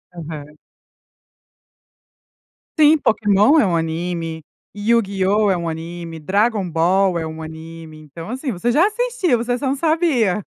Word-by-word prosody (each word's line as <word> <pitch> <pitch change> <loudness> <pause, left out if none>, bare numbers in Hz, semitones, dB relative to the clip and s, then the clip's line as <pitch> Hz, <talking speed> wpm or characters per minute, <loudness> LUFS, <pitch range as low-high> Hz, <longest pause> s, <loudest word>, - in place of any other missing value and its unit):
Aham. 150 -2 -8 2.2
Sim, 310 +1 +6
Pokemon 215 +3 +3
é - - +4
um 180 -3 0
anime, 165 0 -3 0.3
YuGiOh 205 -1 +1
é 185 - +1
um 170 -1 -4
anime, 165 0 -7
Dragon 200 +4 0
Ball 180 +3 +2
é 165 - -3
um 160 0 -8
anime, 160 0 -10
então 155 +4 -10
assim 260 +3 -3
você 230 +5 -1
já 310 +9 +4
assistiu, 435 - 0
você 240 +1 -1
só 270 +2 -3
não 270 - 0
sabia. 280 - +1
195 Hz, 135 wpm, -19 LUFS, 165-240 Hz, 2.2 s, Sim